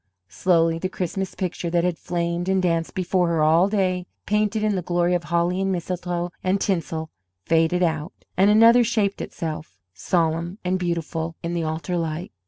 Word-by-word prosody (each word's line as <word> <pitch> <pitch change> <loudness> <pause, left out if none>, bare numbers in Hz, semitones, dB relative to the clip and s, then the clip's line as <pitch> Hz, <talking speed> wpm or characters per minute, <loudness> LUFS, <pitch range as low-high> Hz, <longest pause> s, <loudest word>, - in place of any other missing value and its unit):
Slowly 165 - +2
the 185 - -2
Christmas 190 +1 -3
picture 180 -2 -3
that 170 0 +1
had 180 -2 -1
flamed 175 +1 -2
and 190 0 +3
danced 165 -3 0
before 185 -1 +1
her 165 -2 +1
all 165 +5 +4
day, 185 -3 0 0.2
painted 210 +1 +1
in 215 -1 +2
the 185 - -1
glory 175 +1 +1
of 175 -1 -1
holly 170 +3 +1
and 195 0 0
mistletoe 175 -1 -3
and 185 +2 +1
tinsel, 165 -5 -2 0.3
faded 165 +2 +2
out, 160 0 -1 0.2
and 195 +3 +4
another 230 +3 +7
shaped 215 -3 0
itself, 155 - -6 0.2
solemn 165 - 0
and 185 +1 +1
beautiful 165 -2 -2
in 170 +1 -2
the 170 - -1
altar 160 +3 -2
light. 165 +2 -3
175 Hz, 175 wpm, -23 LUFS, 165-185 Hz, 0.3 s, another